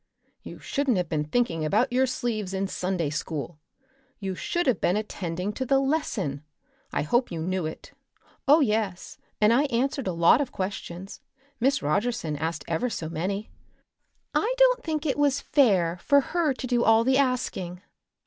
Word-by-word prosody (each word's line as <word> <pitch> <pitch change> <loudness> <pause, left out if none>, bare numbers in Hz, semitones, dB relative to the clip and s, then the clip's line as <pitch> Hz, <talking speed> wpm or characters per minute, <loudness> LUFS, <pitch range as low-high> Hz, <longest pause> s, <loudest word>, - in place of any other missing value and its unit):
"You - - -9
shouldn't 275 -6 0
have 180 -3 -1
been 150 -2 -1
thinking 165 -2 0
about 220 - +1
your 260 +1 +3
sleeves 215 -7 -2
in 195 +1 -1
Sunday 180 -5 -2
school. 155 +1 -4 0.6
You 195 -2 -4
should 345 - -2
have 255 -8 +1
been 180 - +2
attending 185 -2 -3
to 260 - -3
the 270 +1 +3
lesson. 265 - -1 0.5
I - - 0
hope 240 - +1
you 165 - -4
knew 180 0 -1
it." 160 - -9 0.6
"Oh, 300 +3 +7
yes; 210 -7 -1 0.2
and 215 +2 +5
I 275 +5 +3
answered 270 -1 -1
a - - +1
lot 170 +9 +5
of 280 - -3
questions. 190 -1 -5 0.4
Miss 270 +3 +2
Rogerson 200 0 0
asked 160 +2 -3
ever 170 +9 0
so 160 -8 -4
many. 195 +6 -3 0.8
I 445 - +1
don't - - +4
think 310 -1 -2
it 285 -1 0
was 285 -1 +3
fair 190 - +3
for 285 - +5
her 320 +2 0
to 260 0 -5
do 240 -1 +1
all 225 +1 +5
the 265 +2 +3
asking. 190 -9 -1
215 Hz, 170 wpm, -26 LUFS, 175-265 Hz, 0.8 s, Oh